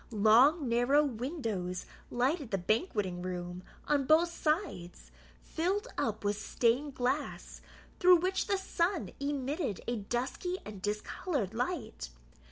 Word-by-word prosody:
Long 245 - +5
narrow 245 +5 +4
windows 225 - -3 0.2
lighted 265 +3 0
the 195 - 0
banqueting 195 - 0
room 180 0 -5 0.3
on 285 -2 +2
both 330 +2 +5
sides, 305 - -2 0.3
filled 370 +6 -1
up 220 -1 -1
with 205 +1 0
stained 260 +4 +1
glass, 260 +4 -2 0.4
through 365 0 +8
which 370 +2 0
the 400 - +2
sun 370 -1 -1
emitted 280 - -2
a 240 0 0
dusky 250 - -2
and 205 -3 -8
discoloured 210 - -2
light. 240 - -3
255 Hz, 120 wpm, -32 LUFS, 210-320 Hz, 0.4 s, through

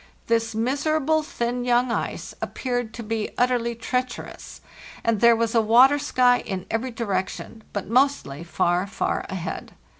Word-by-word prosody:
This 230 -1 0
miserable 295 +6 +1
thin 245 -4 -3
young 245 0 +2
ice - - -3
appeared 245 -3 -3
to 235 - -6
be 220 0 -2
utterly 240 -1 +1
treacherous, 250 +2 -4 0.4
and 225 -3 +1
there 235 0 +7
was 230 0 0
a 230 - +4
water 250 +6 +6
sky 250 -3 +3
in 190 -3 -5
every 225 +4 -1
direction, 220 -1 -4
but 205 - -3
mostly 235 - +1
far, 175 +2 0
far 195 - -2
ahead. 180 -2 -5
235 Hz, 145 wpm, -24 LUFS, 220-250 Hz, 0.4 s, there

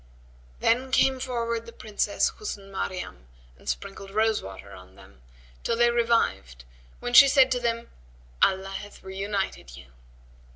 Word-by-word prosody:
Then 255 +3 +2
came 265 0 +3
forward 235 -3 -2
the - - -8
Princess 215 -2 -1
Husn 200 - -7
Maryam 180 - -5 0.3
and - - -8
sprinkled 195 0 -5
rose 220 +2 +1
water 95 +1 -10
on 95 0 -14
them, 65 - -18 0.4
till 230 - 0
they 240 0 +4
revived 230 - 0 0.3
when 245 - -4
she 275 +3 +10
said 265 -1 +5
to 250 - +1
them, 235 -1 -2 0.5
"Allah 190 0 +3
hath 205 0 -12
reunited 190 - -4
you." 65 -3 -14
210 Hz, 140 wpm, -26 LUFS, 190-235 Hz, 0.5 s, she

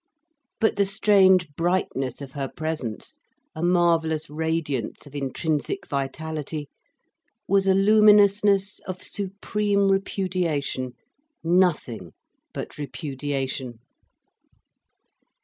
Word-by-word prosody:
But 220 - +2
the 200 - +3
strange 190 -5 +4
brightness 165 -7 -1
of 135 -2 -8
her 135 -1 -3
presence, 155 -9 -5 0.3
a 160 - -7
marvellous 165 -3 +2
radiance 155 -6 -2
of 145 - -14
intrinsic 145 +2 -2
vitality, 150 +1 -4 0.8
was 195 0 +2
a 190 - +5
luminousness 205 -1 +5
of 185 -1 -5
supreme 200 0 0
repudiation, 180 -9 -1 0.5
nothing 165 - +1 0.4
but - - -7
repudiation. 135 -3 -4
165 Hz, 85 wpm, -24 LUFS, 145-195 Hz, 0.8 s, a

